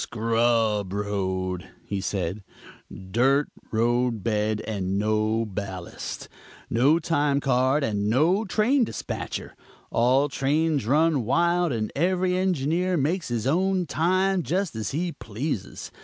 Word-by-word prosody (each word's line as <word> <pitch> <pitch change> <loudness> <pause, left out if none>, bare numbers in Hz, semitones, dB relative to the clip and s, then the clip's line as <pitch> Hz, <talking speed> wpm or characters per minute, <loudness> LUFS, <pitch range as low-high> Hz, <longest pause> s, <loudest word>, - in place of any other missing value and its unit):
"Scrub 115 -3 +1
road," 95 -3 -2 0.2
he 100 -1 -3
said, 95 0 -3 0.5
"dirt 125 +10 +1 0.2
road 120 -1 +1
bed 105 -1 0
and 100 -3 -2
no 110 +2 +1
ballast; 95 -3 -6 0.4
no 135 +8 +4
time 145 -4 +1
card, 135 +1 +2
and 105 -4 0
no 165 - +3
train 230 +6 +2
dispatcher. - - -5 0.4
All 130 +5 +3
trains 145 -1 0
run 150 0 +3
wild 170 +7 +2
and 110 -3 -2
every 180 +3 +1
engineer 180 0 +1
makes 165 +5 0
his 120 -2 -2
own 185 +5 +1
time, 185 +4 +1
just 180 - -1
as 110 -1 -3
he 170 +5 -2
pleases. 115 - -5
130 Hz, 120 wpm, -25 LUFS, 110-165 Hz, 0.5 s, no